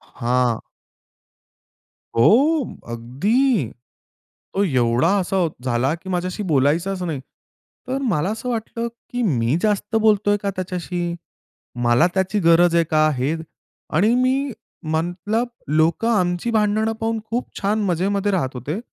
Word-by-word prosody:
हां. 120 -1 0 1.6
हो 270 - +4 0.3
अगदी! 170 - +1 0.9
तो 200 - +2
एवढा 125 -2 +2
असा 190 +1 -2 0.3
झाला 130 +4 +1
की 180 +3 -10
माझ्याशी 185 +3 -2
बोलायचाच 165 +7 +1
नाही. 160 -6 -3 0.7
तर 265 +1 -1
मला 180 +1 0
असं 225 +3 -4
वाटलं 230 0 -3 0.2
की 245 0 -2
मी 130 - +1
जास्त 210 +1 0
बोलतोय 210 -2 +3
का 200 - 0
त्याच्याशी? 175 -1 -3 0.7
मला 120 +8 +4
त्याची 190 +2 +1
गरज 170 0 +5
आहे 170 - +4
का? 155 0 +4
हे 135 +3 -1 0.6
आणि 210 +8 +4
मी 260 +2 +1 0.4
म्हटलं, 175 +8 -1 0.2
लोकं 160 +9 +2
आमची 180 +1 +1
भांडणं 215 0 +1
पाहून 225 0 -2
खूप 240 +2 -2
छान 210 +2 +1
मजेमध्ये 195 +3 0
राहत 150 -9 0
होते 135 - -4
185 Hz, 125 wpm, -21 LUFS, 155-220 Hz, 1.6 s, गरज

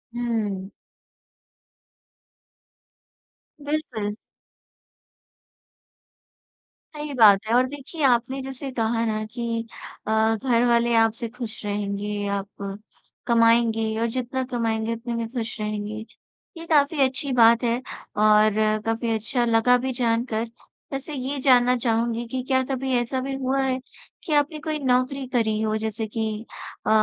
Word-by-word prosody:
हुँ। 215 -5 -2 3.0
बिल्कुल। 285 -9 -2 2.8
सही 295 -1 -5
बात 210 -6 +6
है 225 - 0
और 250 +1 +5
देखिए, 290 +3 -8
आपने 255 +1 +2
जैसे 270 +1 -6
कहा 230 -1 0
ना 215 -1 -1
कि 230 -1 -3 0.4
अ, 220 +1 +3
घरवाले 235 0 +2
आपसे 225 +1 +2
खुश 235 -2 -7
रहेंगे, 205 0 -2
आप 200 0 -4 0.5
कमाएँगे 230 -2 +3
और 230 - +2
जितना 255 +1 -2
कमाएँगे, 225 -2 0
उतने 235 +1 -5
में 230 -1 -2
खुश 235 -2 -4
रहेंगे। 215 +1 -4 0.5
ये 330 - -8
काफ़ी 290 -1 +3
अच्छी 265 +2 -4
बात 235 0 +6
है 235 0 +2 0.4
और 215 0 +5 0.3
काफ़ी 225 +1 -1
अच्छा 230 +3 -1
लगा 230 +2 +4
भी 260 +1 -2
जानकर। 230 -2 0 0.5
वैसे 275 +3 -4
ये 275 +1 -3
जानना 250 -2 +5
चाहूँगी 235 0 0
कि 255 +2 -3
क्या 260 -1 +2
कभी 265 0 -1
ऐसा 240 +2 -1
भी 270 +1 -3
हुआ 270 +1 0
है 260 -1 0 0.4
कि 315 - -2
आपने 295 +1 +1
कोई 305 +1 -3
नौकरी 260 0 +1
करी 220 -3 +1
हो, 215 0 0
जैसे 220 0 -3
कि 220 0 -3 0.4
अ, - - 0
235 Hz, 125 wpm, -24 LUFS, 220-260 Hz, 3.0 s, बात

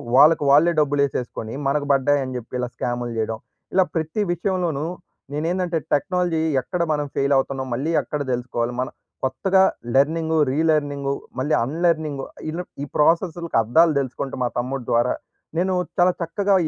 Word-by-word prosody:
వాళ్ళకి 150 +3 +6
వాళ్ళే 155 +5 +6
డబ్బులు 145 -1 +2
ఏసేసుకొని 125 -4 -4
మనకు 145 +1 +1
బడ్డాయని 135 -1 +2
జెప్పి 120 0 -10
ఇలా 125 - -1
స్కామ్‌లు 120 0 -2
చేయడం. 110 0 -1 0.4
ఇలా 190 - +5
ప్రతి 160 +6 -1
విషయంలోనూ 175 -4 -1 0.5
నేనేందంటే 170 +3 -1 0.2
టెక్నాలజీ 175 +1 +1 0.2
ఎక్కడ 175 +7 -3
మనం 150 -1 0
ఫెయిల్ 140 +1 +2
అవుతున్నాం? 135 0 -1
మళ్ళీ 140 +7 -1
ఎక్కడ 150 -1 -4
దెలుసుకోవాలి? 120 -1 -2
మనం 130 - -2 0.3
కొత్తగా 185 +9 +3 0.3
లెర్నింగు, 160 +3 +2
రీ 140 - 0
లెర్నింగు 145 -2 +1 0.3
మళ్ళీ 145 +4 0
అన్ 135 +6 -4
లెర్నింగు 155 -5 0 0.3
ఇలబ్ 175 +3 -5
ఈ - - -2
ప్రాసెస్ల్‌కి 170 +1 +2
అర్ధాలు 160 +9 +4
దెలుసుకుంటూ 135 0 -4
మా 120 - +1
తమ్ముడు 130 +1 -3
ద్వారా. 120 +1 +3 0.4
నేను 185 +2 +1 0.3
చాలా 180 +1 +6
చక్కగా 195 +4 +1
145 Hz, 150 wpm, -22 LUFS, 130-165 Hz, 0.5 s, వాళ్ళకి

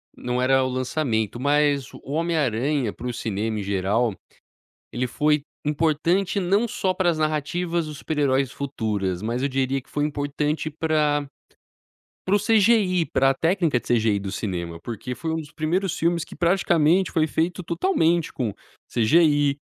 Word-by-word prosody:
não 125 0 -2
era 135 +1 +3
o 130 - -1
lançamento 125 -4 -1
mas 145 -1 +1
o - - -12
Homem 165 +4 -1
Aranha 130 -2 0
para 125 - -7
o 125 - -3
cinema 110 -1 -2
em - - -3
geral, 100 +3 0 0.8
ele 125 +1 -1
foi 150 +4 +1 0.2
importante, 165 +6 +1
não 200 +6 +2
só 190 -3 -1
para 185 -1 +1
as 160 - 0
narrativas 160 +3 -1
dos 150 -1 -8
super-heróis 135 -3 0
futuras 105 -9 -2
mas 115 +3 -2
eu - - +2
diria 135 0 -1
que - - -27
foi 145 0 -1
importante 150 +1 -2
para 150 -2 0 1.0
para 195 +2 +3
o - - +3
CGI, 205 -5 +3
pra 135 0 +2
técnica 165 -5 +1
de - - -14
CGI 110 -3 +2
do 95 -1 -5
cinema. 85 -5 -4
Porque 120 +2 -5
foi 160 -1 -3
um 160 - -1
dos 150 -2 -7
primeiros 170 +4 -1
filmes 170 0 +1
que - - -10
praticamente 170 0 +3
foi 160 -2 +2
feito 165 +4 -1
totalmente 170 - +1
com 115 -6 -3 0.4
CGI. 145 +3 +4
145 Hz, 160 wpm, -24 LUFS, 125-170 Hz, 1.0 s, CGI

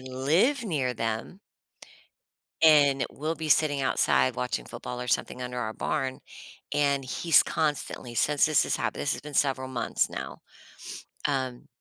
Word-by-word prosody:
live 150 - +1
near 140 - -1
them. 115 - -4 1.2
And 145 -4 +5
we'll 155 +3 -3
be 160 -1 -5
sitting 145 -2 +3
outside 65 - +2
watching 60 -1 -3
football 125 0 -7
or 125 - -5
something 125 +1 -1
under 125 0 -5
our 110 -2 -3
barn, 135 -3 -2 0.5
and 140 -2 +1
he's 160 +4 +4
constantly 145 -5 -2
since 145 +5 +3
this 155 -1 +3
has - - 0
happened - - -3
this 145 - 0
has - - -6
been 150 0 -10
several 135 -1 +1
months 120 -3 -1
now, - - -6 0.9
um, 130 -3 -3
135 Hz, 145 wpm, -27 LUFS, 125-150 Hz, 1.2 s, And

